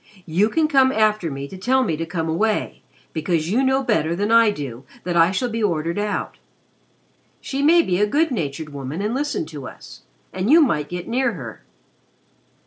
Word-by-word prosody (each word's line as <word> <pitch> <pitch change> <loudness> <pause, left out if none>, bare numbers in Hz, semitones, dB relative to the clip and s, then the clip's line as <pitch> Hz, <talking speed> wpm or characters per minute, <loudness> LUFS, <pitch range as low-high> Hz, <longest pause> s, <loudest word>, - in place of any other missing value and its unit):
You 185 +6 +2
can 315 +5 +2
come 270 -3 +4
after 215 -6 +1
me 140 -1 -5
to 190 - -10
tell 260 +7 +2
me 170 -9 -1
to 165 +2 -4
come 165 -1 -3
away, 210 +7 -1 0.3
because 165 +1 -1
you 240 +5 +2
know 265 0 +2
better 170 -9 +1
than 205 +4 -1
I 230 -1 +6
do 135 - -5 0.2
that 175 0 -2
I 165 0 +5
shall 200 +7 -1
be 230 -1 -3
ordered 170 -2 -1
out. 205 0 -3 1.0
She 275 0 -4
may 335 +4 +5
be 180 - 0
a 210 - +3
good 305 +7 +1
natured 155 - -3
woman 145 +5 -5
and 215 +2 -1
listen 290 - -2
to 150 -4 -8
us - - -12 0.3
and 190 +4 -2
you 320 +4 +7
might 150 - +1
get 175 0 -5
near 245 0 0
her." 125 - -8
195 Hz, 195 wpm, -21 LUFS, 160-245 Hz, 1.0 s, you